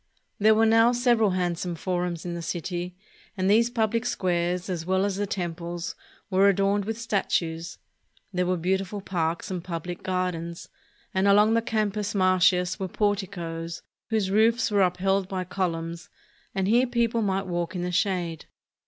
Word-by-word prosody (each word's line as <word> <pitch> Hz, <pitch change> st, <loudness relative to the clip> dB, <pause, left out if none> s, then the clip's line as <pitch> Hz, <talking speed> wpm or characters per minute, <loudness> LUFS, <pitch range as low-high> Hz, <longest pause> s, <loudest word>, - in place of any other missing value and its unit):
There 215 Hz, +1 st, +5 dB
were 225 Hz, +1 st, +4 dB
now 225 Hz, +2 st, +5 dB
several 240 Hz, -3 st, +3 dB
handsome 175 Hz, -1 st, -1 dB
forums 175 Hz, -1 st, -2 dB
in 175 Hz, -, -3 dB
the 170 Hz, -, -4 dB
city; 175 Hz, +1 st, -4 dB, 0.4 s
and 185 Hz, 0 st, 0 dB
these 225 Hz, +4 st, +4 dB
pubHc 230 Hz, -1 st, 0 dB
squares, 180 Hz, -4 st, 0 dB
as 175 Hz, -4 st, -3 dB
well 190 Hz, +2 st, +1 dB
as 200 Hz, -2 st, -1 dB
the 205 Hz, 0 st, -1 dB
temples, 175 Hz, -2 st, -4 dB, 0.4 s
were 195 Hz, +2 st, +5 dB
adorned 200 Hz, +1 st, +1 dB
with 225 Hz, +1 st, -3 dB
statues. 170 Hz, -7 st, -1 dB, 0.6 s
There 180 Hz, 0 st, 0 dB
were 185 Hz, 0 st, +1 dB
beautiful 190 Hz, +3 st, -1 dB
parks 170 Hz, -3 st, -2 dB
and 180 Hz, -2 st, -3 dB
pubHc 175 Hz, 0 st, -5 dB
gardens, 180 Hz, -2 st, -3 dB, 0.4 s
and 190 Hz, +1 st, +2 dB
along 210 Hz, +2 st, +5 dB
the 230 Hz, -, +3 dB
Campus 210 Hz, -2 st, -1 dB
Martius 185 Hz, 0 st, +3 dB
were 190 Hz, -, -2 dB
porticoes, 175 Hz, -5 st, -2 dB, 0.3 s
whose 215 Hz, -4 st, 0 dB
roofs 225 Hz, +3 st, +3 dB
were 205 Hz, -1 st, +3 dB
up 180 Hz, -1 st, +2 dB
held 195 Hz, +1 st, +1 dB
by 185 Hz, -1 st, -3 dB
columns, 170 Hz, -2 st, -3 dB, 0.5 s
and 190 Hz, -1 st, 0 dB
here 240 Hz, +5 st, +4 dB
people 235 Hz, -1 st, +1 dB
might 195 Hz, -2 st, 0 dB
walk 175 Hz, 0 st, -3 dB
in 175 Hz, -, -2 dB
the 180 Hz, -, -2 dB
shade. 175 Hz, -3 st, -1 dB
185 Hz, 160 wpm, -26 LUFS, 175-205 Hz, 0.6 s, There